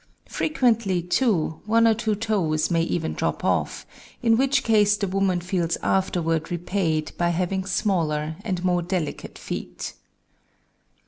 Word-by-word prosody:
Frequently, 230 - +1
too, 180 -5 +1
one 230 +1 +4
or 225 - +5
two 220 -1 -1
toes 190 -8 0
may 165 -1 +3
even 165 -1 -1
drop - - -2
off, - - 0 0.4
in 225 -1 +5
which 265 +2 +2
case 210 -2 +4
the 200 - -1
woman 190 -1 +1
feels 175 -1 -1
afterward 165 -4 0
repaid 175 -3 -1
by 175 0 +2
having 185 +2 -1
smaller 165 -6 0
and 185 -5 -2
more 180 -1 +2
delicate 175 -3 -4
feet. - - -6
185 Hz, 135 wpm, -24 LUFS, 170-215 Hz, 0.4 s, or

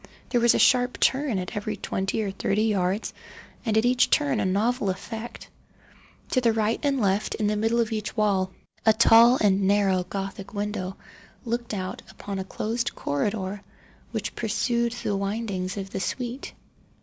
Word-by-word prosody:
There 240 - +2
was 235 0 +5
a - - +3
sharp 245 +2 +3
turn 265 -5 +2
at 180 -1 -4
every 210 0 -3
twenty 195 +3 -2
or 200 - -2
thirty 200 +2 0
yards, 200 -2 0 0.5
and 220 -3 +1
at 220 - +3
each 245 0 +3
turn 280 -6 +2
a 210 - 0
novel 210 +3 +1
effect. 220 +5 -6 0.8
To 255 - +2
the 230 -2 +3
right 220 +1 +1
and 280 -2 +1
left, 200 -1 +1
in 215 - -1
the 210 +1 +1
middle 225 +3 +1
of 230 -1 +1
each 215 +1 -4
wall, 195 -3 +2 0.3
a 220 - +5
tall 235 +2 +7
and 200 -2 +3
narrow 195 -2 +3
Gothic 195 +2 -6
window 205 -2 -3 0.5
looked 235 0 -2
out 185 -1 -4
upon 200 -1 -6
a - - -2
closed 230 +5 -3
corridor 190 +7 -2 0.5
which - - -3
pursued 235 +1 0
the 205 - -2
windings 195 -2 -3
of 195 -1 -5
the - - -3
suite. 245 +6 -4
215 Hz, 170 wpm, -25 LUFS, 195-235 Hz, 0.8 s, tall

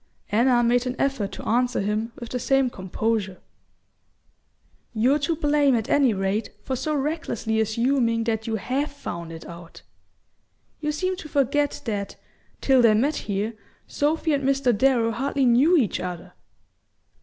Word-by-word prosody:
Anna 240 +3 +3
made 245 +1 +2
an 250 - -2
effort 270 -8 -1
to - - -8
answer 245 +2 +1
him 215 +3 -1
with 235 - -7
the 250 - -3
same 270 0 +2
composure. 195 0 -2 1.6
"You're 255 +7 +3
to 310 +3 0
blame, 290 -3 +2
at 225 -2 -2
any 275 -4 +4
rate, 195 +2 -1
for 265 - -2
so 305 +4 -2
recklessly 275 -7 -2
assuming 230 +1 +1
that 225 -1 -2
you 225 - -1
HAVE 260 +8 -2
found 170 -12 -7
it 165 0 -9
out. 170 0 -11 1.0
You 300 -1 -1
seem 370 +4 -2
to 315 -5 -9
forget 285 +1 0
that, 205 -4 -3 0.5
till 265 -2 +4
they 225 -3 +5
met 275 +8 +1
here, 205 +3 -1 0.3
Sophy 310 +2 0
and 280 -1 0
Mr. 270 -3 +2
Darrow 235 -1 +2
hardly 270 +3 0
knew 265 +9 +5
each 240 - +1
other." 180 -1 -6
245 Hz, 155 wpm, -24 LUFS, 220-280 Hz, 1.6 s, they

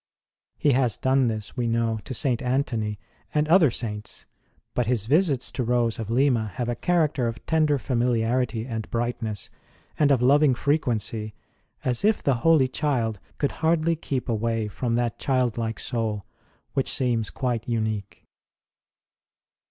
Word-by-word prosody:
He 145 - +3
has 125 -3 +2
done 130 -1 +2
this, 110 -2 -4
we 120 -3 -1
know, 115 -1 0
to 130 - -4
St. 125 -1 0
Antony 125 -5 -1 0.4
and 150 0 +2
other 165 -2 +6
Saints; 105 -3 -5 0.5
but 125 -2 0
His 120 -4 +1
visits 145 - +2
to 130 - -2
Rose 120 -1 +1
of 110 -2 -4
Lima 120 -2 +2
have 120 - -2
a 120 - -1
character 150 -4 +1
of 115 0 -6
tender 155 -3 +2
familiarity 120 -2 0
and 110 -4 -5
brightness, 115 -3 -3 0.5
and 150 -2 +4
of 135 - +4
loving 140 +2 +4
frequency 115 -7 -1 0.5
as 125 -2 0
if 215 +1 +2
the 135 -3 +2
Holy 160 -5 +5
Child 125 -6 -1 0.2
could 140 - 0
hardly 165 0 +2
keep 135 -5 -3
away 115 -1 0
from 115 +3 -2
that 120 -1 -1
childlike 120 -4 0
soul 110 -5 -2 0.5
which 135 - 0
seems 120 -4 0
quite 120 -3 -2
unique. 110 -3 -3
120 Hz, 145 wpm, -25 LUFS, 115-135 Hz, 0.5 s, other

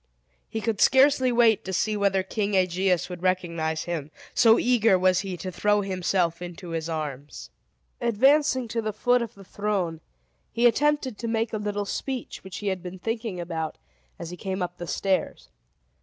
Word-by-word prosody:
He 220 - -3
could 220 -1 -1
scarcely 265 -1 +5
wait 235 -3 +4
to 190 - -5
see 210 +4 0
whether 200 -2 +1
King 205 +1 -2
Aegeus 185 -1 +1
would 180 -1 -8
recognize 170 -4 -1
him, 160 -4 -4 0.2
so 225 -1 +6
eager 230 -5 +4
was 185 0 +3
he 190 -3 -4
to 185 +2 -5
throw 205 +3 +2
himself 180 -3 0
into 175 0 -8
his 165 0 -3
arms. 150 -3 -5 0.5
Advancing 260 +2 +3
to 230 +1 -1
the 215 -1 -3
foot 245 +4 +2
of 235 0 -5
the 200 - -13
throne, 190 -5 -2 0.5
he 235 - +1
attempted 270 -1 +2
to 230 - -3
make 225 0 -1
a - - 0
little 205 0 -2
speech, 255 +4 -5
which 190 -1 -8
he 205 - -2
had 190 -2 -3
been 180 +1 -7
thinking 225 -1 -3
about, 165 -2 -4 0.4
as 170 0 -7
he 180 - -7
came 190 +1 -3
up 175 0 -6
the 175 - -5
stairs. 185 - -1
195 Hz, 180 wpm, -26 LUFS, 175-225 Hz, 0.5 s, so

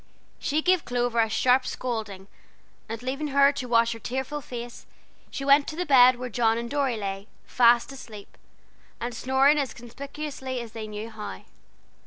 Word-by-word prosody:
She 305 +2 -1
gave 365 -1 +3
Clover 245 -1 -1
a 225 -1 +3
sharp 255 +3 +3
scolding, 215 -6 -4 0.6
and 225 +2 -6
leaving 275 +4 -3
her 280 0 +5
to 280 -3 -5
wash 230 -1 +3
her 230 - -6
tearful 265 +6 -4
face, 240 -2 -8 0.4
she 275 - -5
went 280 +1 +5
to 310 - -5
the 360 +2 -2
bed 255 -4 +7
where 250 +1 -5
John 230 -1 +1
and 235 0 -3
Dorry 275 -5 0
lay, 195 -1 -5 0.2
fast 240 +1 +4
asleep, 220 -6 -11 0.6
and 240 +1 -4
snoring 265 +5 +3
as 275 -3 -3
conspicuously 265 +1 -6
as 235 -2 -7
they 220 -1 -6
knew 215 +2 -7
how. 210 - -8
245 Hz, 170 wpm, -26 LUFS, 230-275 Hz, 0.6 s, bed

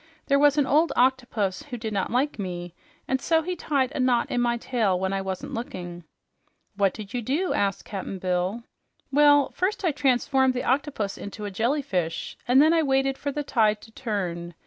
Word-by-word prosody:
There 280 -1 +3
was 290 0 +4
an 290 - +4
old 310 +5 +3
octopus 245 -7 +1
who 255 -4 -7
did 220 -1 -4
not 195 -2 -1
like 255 0 0
me, 175 -3 -5 0.3
and 265 0 0
so 320 +2 +2
he 360 +2 -3
tied 275 -6 0
a - - -5
knot 250 -2 +2
in 245 - +1
my 240 0 +1
tail 220 -7 0
when 190 +1 -1
I 195 - -1
wasn't 190 -1 -5
looking." 175 -7 -6 0.7
"What 200 -1 +2
did 210 -3 -9
you 245 - -1
do?" 295 - 0
asked 200 -2 -1
Cap'n 195 -1 -5
Bill. 185 +5 -1 0.5
"Well, 290 0 +5
first 390 +2 -1
I 340 - +3
transformed 265 -1 +2
the 250 - -2
octopus 260 -6 -1
into 210 +1 -7
a 205 - -4
jellyfish, 220 - -1
and 250 +2 +5
then 310 +3 +6
I 330 - +4
waited 270 -2 +1
for 285 +1 -4
the 295 +1 -3
tide 215 -6 +2
to 225 - -15
turn. 180 -8 -4
245 Hz, 195 wpm, -25 LUFS, 195-280 Hz, 0.7 s, then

